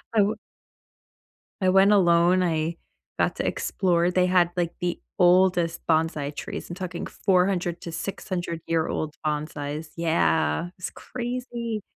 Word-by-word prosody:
I 215 - +6
we 215 +2 0 1.3
I 185 - +3
went 195 +2 +5
alone. 175 -2 +4
I 165 -1 -1 0.4
got - - +1
to - - -2
explore. 175 -2 +1
They 180 0 +2
had, 180 -1 +3
like, 170 -1 0
the 175 -1 -1 0.2
oldest 175 -1 +4
bonsai 155 -3 0
trees. - - -6
I'm 175 - -5
talking 185 -2 -5
400 180 -2 +1
to 170 - -6
600 175 -1 -4
year 165 -1 0
old 155 -1 -3
bonsais 150 0 -3
Yeah. 165 0 +1
It - - -25
was 185 - -4
crazy. 240 -2 -5
175 Hz, 140 wpm, -25 LUFS, 165-185 Hz, 1.3 s, I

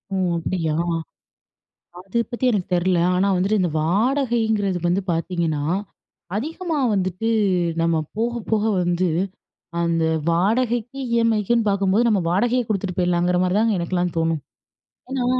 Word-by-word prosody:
ஓ! - - 0 0.2
அப்படியா! 165 -2 -1 1.2
அது 190 +5 -3
பத்தி 240 +1 -3
எனக்கு 205 -6 0
தெர்ல. 180 0 +2 0.2
ஆனா 190 +2 +2
வந்துட்டு, 195 +4 +1
இந்த 175 - +1
வாடகைங்கிறது 220 - +1
வந்து 180 +3 +1
பார்த்தீங்கன்னா, 165 -3 -1 0.7
அதிகமா 320 - -3 0.2
வந்துட்டு 185 +3 -1 0.5
நம்ம 165 -1 +2 0.2
போக, 230 +2 0 0.2
போக 220 -2 +2 0.2
வந்து, 175 +1 +1 0.7
அந்த 165 -1 +1 0.3
வாடகைக்கு 230 +7 0 0.2
இஎம்ஐக்குன்னு 230 -1 +2
பாக்கும்போது, 200 +4 +2
நம்ம 205 -4 +2
வாடகையை 240 +7 +2
கொடுத்துட்டு 195 -3 -2
போயிடலாங்கிற 180 0 +2
மாதிரி 185 +2 +1
தாங்க 220 -3 +2
எனக்கெல்லாம் 175 0 -1
தோணும். 165 -2 0 0.7
ஏன்னா 265 -2 -1
195 Hz, 120 wpm, -22 LUFS, 175-230 Hz, 1.2 s, தெர்ல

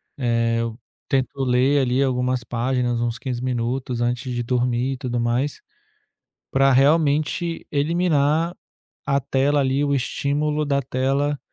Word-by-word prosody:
eh, 115 -3 +1
eu 115 0 -4 0.3
tento 135 0 -1
ler 130 +3 +3
ali 130 +1 +1
algumas 125 -1 0
páginas 120 0 -1
uns 120 0 -1
15 125 0 -2
antes 125 +2 -1
de 120 -1 -2
dormir 125 +1 0
e - - -6
tudo 120 -1 -3
mais 120 +5 -1 0.9
para 135 0 +4
realmente 155 +5 +2
eliminar 160 +1 +1 0.5
a 140 0 +2
tela 140 +2 +1
ali 135 +1 +1
o 140 -1 +1
estímulo 145 +3 -1
da 140 -1 0
tela 135 +3 0
130 Hz, 130 wpm, -22 LUFS, 125-145 Hz, 0.9 s, para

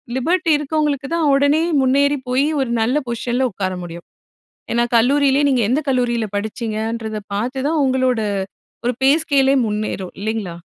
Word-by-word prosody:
Liberty 335 +6 +1
இருக்கவங்களுக்கு 295 -2 -1
தான் 325 -3 +1
உடனே 285 +3 +3 0.2
முன்னேறி 280 +2 +2
போய், 260 +3 +2 0.2
ஒரு 260 - -2
நல்ல 245 +6 +1
பொசிஷன்ல 240 +2 -1
உட்கார 185 -1 -3
முடியும். 170 0 -9 0.7
ஏன்னா 235 0 +2
கல்லூரியிலே, 275 +3 +3
நீங்க 255 -3 +2
எந்த 260 +5 +2
கல்லூரியில 240 -3 0
படிச்சீங்கன்றத 220 0 -3 0.2
பார்த்துதான் 265 +8 -1
உங்களோட 255 -2 +1 0.7
ஒரு 245 - +1
பேஸ்கேலே 275 -2 +3
முன்னேறும், 210 -3 -3
இல்லைங்களா? 210 -5 -3
255 Hz, 130 wpm, -19 LUFS, 225-280 Hz, 0.7 s, உடனே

